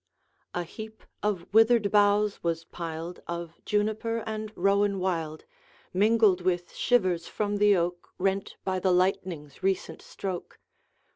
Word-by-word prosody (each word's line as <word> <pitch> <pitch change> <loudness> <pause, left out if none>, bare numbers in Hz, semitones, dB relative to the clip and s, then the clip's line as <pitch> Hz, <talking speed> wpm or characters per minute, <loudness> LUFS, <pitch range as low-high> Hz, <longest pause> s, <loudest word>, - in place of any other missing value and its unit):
A 175 - 0
heap 220 +5 -10 0.2
of 200 -5 -1
withered 225 -1 +5
boughs 205 0 +3
was 165 -1 -1
piled, 165 +1 -6
Of 170 -1 -6
juniper 220 +2 0
and 215 -1 -4
rowan 200 +2 +2
wild, 165 -4 -2 0.5
Mingled 205 -1 +4
with 175 -1 -1
shivers 185 -9 +2
from 205 -1 -1
the 205 0 +5
oak, 175 +1 -2
Rent 195 +1 -1
by 185 -1 0
the 185 0 +2
lightning's 180 -5 0
recent 190 0 -1
stroke. 185 -3 -6
190 Hz, 130 wpm, -28 LUFS, 175-210 Hz, 0.5 s, withered